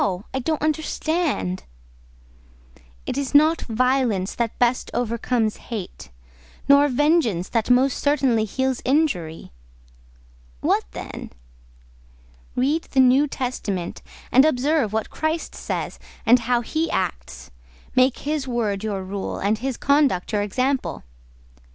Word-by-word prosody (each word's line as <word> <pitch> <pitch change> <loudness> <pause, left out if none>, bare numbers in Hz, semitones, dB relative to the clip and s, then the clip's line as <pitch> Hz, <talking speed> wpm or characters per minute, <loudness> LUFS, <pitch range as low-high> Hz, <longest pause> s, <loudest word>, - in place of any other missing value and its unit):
I 265 - 0
don't 310 +3 -2
understand." 310 - -1 1.4
"It 275 - -2
is 280 0 -3
not 310 +3 +5
violence 240 -5 +1
that 235 -2 -2
best 245 0 +1
overcomes 235 -1 0
hate—nor 65 - -1
vengeance 270 - +2
that 230 -1 0
most 255 +2 +3
certainly 265 -6 +2
heals 260 +4 -1
injury." 250 - 0 1.1
"What - - +1
then?" - - -7 1.3
"Read 285 +6 +1
the 265 - -1
New 260 +3 +5
Testament, 220 -10 -4 0.3
and 265 - +7
observe 285 -4 +2
what 220 0 -2
Christ 315 +1 -2
says, - - -4 0.3
and 245 +2 +6
how 245 -1 +3
He 315 +7 -2
acts; 60 +1 -4 0.4
make 255 0 +4
His 295 -2 -2
word 215 -5 -1
your 200 -3 -2
rule, 195 +1 -4
and 210 +2 0
His 260 0 -3
conduct 280 -10 +2
your 205 - +2
example." 255 +7 -1
250 Hz, 115 wpm, -23 LUFS, 210-285 Hz, 1.4 s, and